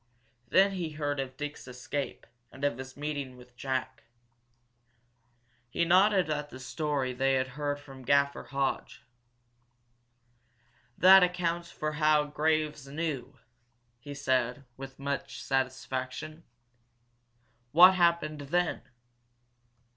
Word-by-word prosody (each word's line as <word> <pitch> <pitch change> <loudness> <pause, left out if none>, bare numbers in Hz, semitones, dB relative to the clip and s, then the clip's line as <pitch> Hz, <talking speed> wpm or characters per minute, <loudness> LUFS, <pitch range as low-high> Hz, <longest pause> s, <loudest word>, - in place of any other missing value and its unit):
Then 195 +9 +4
he 175 -5 -4
heard 145 -2 -2
of 130 -1 -5
Dick's 145 -2 -6
escape, 130 +3 -5 0.3
and 135 - -12
of 130 -3 -1
his 130 0 -9
meeting 145 -3 -4
with 125 0 -17
Jack. 130 +1 -4 1.6
He 170 +8 0
nodded 185 +1 +4
at 150 -1 -3
the 130 - -10
story 140 -1 -2
they 135 +2 +1
had 130 0 0
heard 145 +1 -3
from 135 -2 -13
Graffer 140 +2 +2
Hodge. 135 -1 -2 1.9
"That 190 +1 +8
accounts 175 -1 0
for 155 0 -3
how 150 0 +3
Graves 150 -1 -1
knew," 145 -2 -4 0.6
he 145 +4 -9
said, 130 -1 0
with 135 0 -9
much 140 0 -4
satisfaction. 135 +4 -3 1.3
"What 180 +4 +9
happened 170 -4 +2
then?" 175 +5 0
145 Hz, 110 wpm, -29 LUFS, 130-155 Hz, 1.9 s, What